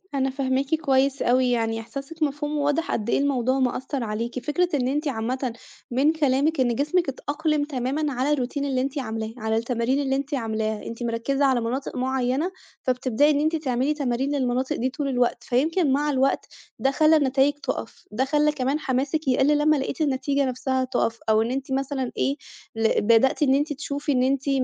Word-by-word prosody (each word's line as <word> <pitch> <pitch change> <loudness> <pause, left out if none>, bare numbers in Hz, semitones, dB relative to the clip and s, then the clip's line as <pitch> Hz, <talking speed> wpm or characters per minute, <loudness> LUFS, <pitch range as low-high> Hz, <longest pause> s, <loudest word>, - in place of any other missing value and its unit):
أنا 270 0 +1
فاهماكِ 270 +2 0
كويس 275 -3 +1
أوي، 250 0 +3
يعني 225 -1 0
إحساسِك 275 +7 -6
مفهوم 295 +1 -1
وواضح 290 +4 0
قد 220 +1 -2
إيه - - +2
الموضوع 265 -2 +1
مأثّر 260 +1 -1
عليكِ. 230 +3 -3
فكرة 350 +4 +1
إن 255 -3 +1
أنتِ 295 +3 -1
عامةً 250 0 -2 0.4
من 275 +5 +3
كلامِك 290 0 +1
إن 240 -2 +2
جسمِك 300 +4 +1
اتأقلِم 295 +2 -1
تمامًا 285 +1 -2
على 260 +4 0
الروتين 280 +1 -2
اللي 260 -2 0
أنتِ 275 +2 -3
عاملاه، 220 -2 -4
على 220 -1 -1
التمارين 235 +3 0
اللي 270 -1 0
أنتِ 280 +1 -3
عاملاها. 220 -3 -2
أنتِ 230 +1 -6
مركّزة 240 +5 0
على 255 -3 +3
مناطق 255 +4 -3
معيّنة، 260 +6 0 0.3
فبتبدئي 255 +2 +2
إن 290 - +1
أنتِ 315 +2 +1
تعملي 270 -1 0
تمارين 275 0 -1
للمناطق 260 +2 0
دي 255 0 -1
طول 285 +2 -4
الوقت، 245 -2 0
فيمكن 300 +4 +1
مع 295 +2 +1
الوقت 270 0 +1 0.3
ده 270 +4 +2
خلّى 310 +2 +4
النتايج 275 0 +3
تُقَف، 290 - -6
ده 255 +5 0
خلّى 300 +2 +2
كمان 280 +1 -1
حماسِك 275 +2 -1
يقل 270 +3 +3
لمّا 305 +1 +3
لقيتِ 275 +2 -3
النتيجة 280 -1 +1
نفسها 260 0 -1
تُقَف 235 -3 -1
أو 220 0 +4
إن 230 - -1
أنتِ 270 +1 -4
مثلًا 265 -1 -1
إيه، 275 - +1 0.4
ل 225 0 +2
بدأتِ 230 +7 +4
إن 265 -2 +4
أنتِ 295 +1 0
تشوفي 285 +1 -3
إن 250 -1 +2
أنتِ 270 +1 0
270 Hz, 185 wpm, -24 LUFS, 250-290 Hz, 0.4 s, خلّى